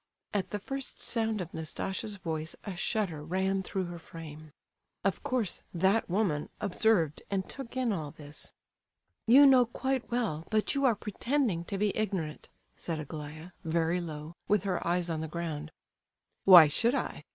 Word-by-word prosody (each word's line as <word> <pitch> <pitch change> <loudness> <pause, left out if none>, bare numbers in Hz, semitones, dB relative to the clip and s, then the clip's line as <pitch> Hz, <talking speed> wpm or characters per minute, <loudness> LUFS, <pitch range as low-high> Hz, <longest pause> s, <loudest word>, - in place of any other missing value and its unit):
At 200 -2 -1
the 210 - -2
first 270 +6 -6
sound 220 -3 0
of 175 - -7
Nastasia's 190 +6 -3
voice 160 -3 -4
a 200 -3 -5
shudder 180 -5 -1
ran 190 +4 0
through 190 0 -2
her 175 0 -7
frame. 155 -2 -10 0.5
Of 195 0 0
course 255 -9 -1
"that 190 +6 +2
woman" 175 -6 0
observed 195 -6 +2
and 195 -1 -1
took 260 -2 -8
in 250 -4 +1
all 155 -6 -3
this. 145 0 -12 0.8
"You 270 +5 +9
know 255 -3 +7
quite 260 +1 -2
well, 220 -10 -1
but 215 -1 +1
you 280 -1 +1
are 240 -4 +5
pretending 215 - -1
to 195 - -3
be 205 0 +1
ignorant," 190 -8 -2 0.3
said 165 -2 -4
Aglaya, 155 +2 -7
very 165 +2 +1
low, 155 -1 -6
with 205 -3 +3
her 185 -4 -1
eyes 175 0 +1
on 160 -1 -2
the 160 - -3
ground. 160 -2 -4 0.8
"Why 175 -5 +11
should 235 - +2
I?" - - -3
185 Hz, 165 wpm, -30 LUFS, 160-220 Hz, 0.8 s, Why